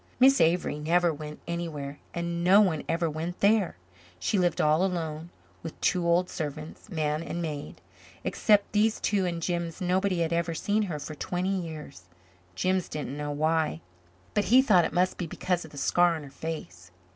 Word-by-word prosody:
Miss 270 Hz, +2 st, +6 dB
Avery 165 Hz, -2 st, +2 dB
never 170 Hz, +2 st, +2 dB
went 150 Hz, 0 st, -8 dB
anywhere 155 Hz, -5 st, -4 dB
and 170 Hz, 0 st, -3 dB
no 190 Hz, +3 st, +7 dB
one 180 Hz, -7 st, +2 dB
ever 165 Hz, +1 st, +1 dB
went 160 Hz, +3 st, -4 dB
there. 200 Hz, -, +3 dB, 0.4 s
She 195 Hz, -, 0 dB
lived 175 Hz, -2 st, +1 dB
all 155 Hz, +3 st, +3 dB
alone 165 Hz, -3 st, -2 dB, 0.3 s
with 160 Hz, -, -8 dB
two 175 Hz, -1 st, +1 dB
old 175 Hz, +1 st, +3 dB
servants, 155 Hz, +5 st, -6 dB
man 155 Hz, -4 st, -1 dB
and 170 Hz, +1 st, -4 dB
maid. 150 Hz, -4 st, -5 dB, 0.4 s
Except 210 Hz, -2 st, +2 dB
these 215 Hz, +1 st, +2 dB
two 195 Hz, -3 st, +1 dB
and 170 Hz, -1 st, -3 dB
Jims 170 Hz, -2 st, -2 dB
nobody 185 Hz, 0 st, +1 dB
had 165 Hz, 0 st, 0 dB
ever 170 Hz, 0 st, 0 dB
seen 205 Hz, +6 st, 0 dB
her 155 Hz, -, -3 dB
for 150 Hz, +1 st, -6 dB
twenty 180 Hz, +5 st, -2 dB
years. 155 Hz, -, -7 dB, 0.5 s
Jims 185 Hz, -, 0 dB
didn't 145 Hz, -3 st, -4 dB
know 150 Hz, 0 st, -4 dB
why, 155 Hz, -, 0 dB, 0.5 s
but 205 Hz, -, +1 dB
he 255 Hz, +4 st, +6 dB
thought 185 Hz, -10 st, +5 dB
it -, -, -2 dB
must 180 Hz, +2 st, +1 dB
be 175 Hz, -, -2 dB
because 175 Hz, +1 st, -2 dB
of -, -, -11 dB
the 145 Hz, -, -13 dB
scar 175 Hz, +4 st, +3 dB
on 155 Hz, -, -6 dB
her 140 Hz, -, -11 dB
face. 90 Hz, -, -7 dB
170 Hz, 180 wpm, -28 LUFS, 155-185 Hz, 0.5 s, no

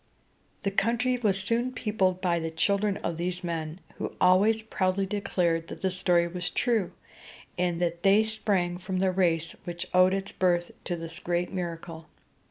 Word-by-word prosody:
The 195 Hz, -, 0 dB
country 240 Hz, +5 st, +1 dB
was 200 Hz, -5 st, +1 dB
soon 235 Hz, +4 st, 0 dB
peopled 195 Hz, -6 st, 0 dB
by 175 Hz, -2 st, +1 dB
the 165 Hz, 0 st, -3 dB
children 200 Hz, +5 st, +1 dB
of 165 Hz, -, -2 dB
these 180 Hz, +1 st, -3 dB
men, 165 Hz, -1 st, -4 dB, 0.2 s
who -, -, -4 dB
always 205 Hz, +5 st, +4 dB
proudly 195 Hz, -2 st, 0 dB
declared 180 Hz, -5 st, 0 dB
that -, -, -9 dB
the 190 Hz, -, +2 dB
story 180 Hz, -2 st, +3 dB
was 180 Hz, +1 st, -4 dB
true, 225 Hz, -7 st, 0 dB, 0.6 s
and 175 Hz, -1 st, 0 dB
that 170 Hz, -1 st, -1 dB
they 200 Hz, +2 st, +5 dB
sprang 200 Hz, -5 st, -1 dB
from 185 Hz, +1 st, -3 dB
the 190 Hz, 0 st, +2 dB
race 170 Hz, -3 st, +1 dB
which 175 Hz, -1 st, -5 dB
owed 185 Hz, +1 st, +5 dB
its 195 Hz, 0 st, -4 dB
birth 175 Hz, -2 st, +1 dB
to 175 Hz, -, -1 dB
this 165 Hz, 0 st, -6 dB
great 175 Hz, +1 st, -1 dB
miracle. 165 Hz, -3 st, -5 dB
185 Hz, 170 wpm, -28 LUFS, 170-200 Hz, 0.6 s, they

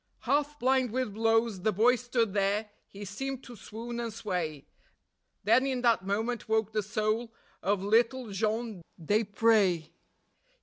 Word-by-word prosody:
Half 290 Hz, +3 st, 0 dB
blind 260 Hz, -1 st, +2 dB
with 255 Hz, -2 st, -2 dB
blows 225 Hz, -2 st, +1 dB
the 215 Hz, -, +2 dB
boy 230 Hz, +6 st, +4 dB
stood 240 Hz, -4 st, -1 dB
there; 205 Hz, +1 st, 0 dB, 0.2 s
he 200 Hz, +1 st, -9 dB
seemed 265 Hz, +7 st, -5 dB
to 245 Hz, -, -10 dB
swoon 230 Hz, +3 st, -7 dB
and 235 Hz, -1 st, -3 dB
sway; 180 Hz, -9 st, -3 dB, 0.8 s
Then 230 Hz, +6 st, +4 dB
in 260 Hz, -2 st, -1 dB
that 230 Hz, -6 st, +2 dB
moment 220 Hz, +3 st, -2 dB
woke 220 Hz, -1 st, +1 dB
the 215 Hz, 0 st, 0 dB
soul 215 Hz, +3 st, -1 dB, 0.3 s
of 195 Hz, 0 st, 0 dB
little 230 Hz, +3 st, +2 dB
Jean 215 Hz, 0 st, -2 dB, 0.2 s
Desprez. 205 Hz, -2 st, +2 dB
220 Hz, 140 wpm, -29 LUFS, 205-240 Hz, 0.8 s, boy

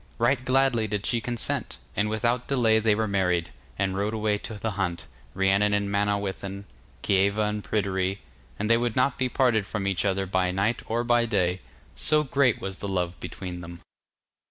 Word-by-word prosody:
Right 130 Hz, -, +2 dB
gladly 130 Hz, -4 st, +2 dB
did 105 Hz, -1 st, -3 dB
she 120 Hz, -2 st, 0 dB
consent, 120 Hz, 0 st, -1 dB, 0.2 s
and 105 Hz, +1 st, +1 dB
without 120 Hz, +3 st, 0 dB
delay 115 Hz, -5 st, +3 dB
they 110 Hz, -1 st, +3 dB
were 110 Hz, +1 st, 0 dB
married, 90 Hz, -4 st, 0 dB, 0.3 s
and 95 Hz, -1 st, 0 dB
rode 105 Hz, +3 st, -1 dB
away 105 Hz, -1 st, 0 dB
to 110 Hz, -, -7 dB
the 110 Hz, +2 st, -3 dB
hunt, 90 Hz, -3 st, -2 dB, 0.3 s
Rhiannon 100 Hz, +2 st, +3 dB
and 100 Hz, -1 st, -1 dB
Manawyddan, 100 Hz, -1 st, -2 dB, 0.4 s
Kieva 100 Hz, +2 st, +2 dB
and 105 Hz, 0 st, -3 dB
Pryderi, 95 Hz, -2 st, -1 dB, 0.4 s
and 105 Hz, -, -2 dB
they 115 Hz, +1 st, +5 dB
would 120 Hz, -1 st, -1 dB
not 130 Hz, +1 st, +2 dB
be 130 Hz, -1 st, +1 dB
parted 120 Hz, -6 st, +2 dB
from 105 Hz, -2 st, -3 dB
each 100 Hz, -2 st, 0 dB
other 95 Hz, -1 st, 0 dB
by 95 Hz, -1 st, +1 dB
night 100 Hz, +5 st, 0 dB
or 115 Hz, +2 st, 0 dB
by 120 Hz, -1 st, +3 dB
day, 90 Hz, -4 st, 0 dB, 0.3 s
so 155 Hz, 0 st, +3 dB
great 135 Hz, -4 st, +2 dB
was 95 Hz, 0 st, -5 dB
the 100 Hz, -, -4 dB
love 90 Hz, -3 st, -2 dB
between 90 Hz, -1 st, -6 dB
them. 85 Hz, 0 st, -9 dB
105 Hz, 180 wpm, -26 LUFS, 95-115 Hz, 0.4 s, they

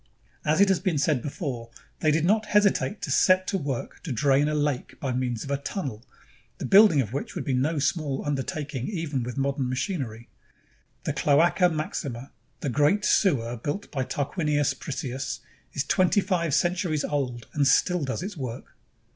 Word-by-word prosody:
As 155 Hz, +1 st, +2 dB
has 195 Hz, -1 st, +4 dB
been 180 Hz, -6 st, 0 dB
said 145 Hz, -2 st, +1 dB
before, 130 Hz, -, -5 dB, 0.3 s
they 155 Hz, -, +2 dB
did 155 Hz, +1 st, +2 dB
not 215 Hz, +3 st, +2 dB
hesitate 210 Hz, 0 st, +2 dB
to -, -, -2 dB
set 185 Hz, 0 st, +4 dB
to 195 Hz, -, -1 dB
work 140 Hz, -5 st, -4 dB
to 160 Hz, -, -6 dB
drain 135 Hz, +4 st, +3 dB
a 150 Hz, -, 0 dB
lake 145 Hz, -3 st, -2 dB
by 135 Hz, -, -2 dB
means 125 Hz, -2 st, -2 dB
of 140 Hz, -, -6 dB
a 140 Hz, -, +1 dB
tunnel, 135 Hz, -, -5 dB, 0.5 s
the -, -, -5 dB
building 200 Hz, -7 st, +7 dB
of 110 Hz, -2 st, -5 dB
which 140 Hz, -, -4 dB
would -, -, -4 dB
be 135 Hz, -, 0 dB
no 145 Hz, +6 st, +1 dB
small 145 Hz, -1 st, -1 dB
under 145 Hz, -2 st, 0 dB
taking 140 Hz, -2 st, -4 dB
even 160 Hz, -9 st, -2 dB
with 120 Hz, +2 st, -5 dB
modern 135 Hz, -1 st, 0 dB
machinery. 130 Hz, -, -3 dB, 0.8 s
The -, -, -1 dB
Cloaca 170 Hz, +5 st, +4 dB
Maxima, 140 Hz, -5 st, -4 dB, 0.3 s
the 140 Hz, -, -1 dB
great 150 Hz, -, +2 dB
sewer 120 Hz, -, +2 dB
built 145 Hz, -, -4 dB
by 135 Hz, -3 st, -1 dB
Tarquinius 145 Hz, +1 st, 0 dB
Priscus, 130 Hz, -2 st, -4 dB, 0.3 s
is -, -, 0 dB
twenty 185 Hz, +2 st, +3 dB
five 170 Hz, -7 st, 0 dB
centuries 175 Hz, -4 st, +1 dB
old 125 Hz, -6 st, -2 dB
and 145 Hz, -2 st, +2 dB
still 180 Hz, +2 st, +3 dB
does 135 Hz, +5 st, -3 dB
its 195 Hz, +1 st, -5 dB
work. 130 Hz, -3 st, -7 dB
145 Hz, 175 wpm, -26 LUFS, 130-175 Hz, 0.8 s, building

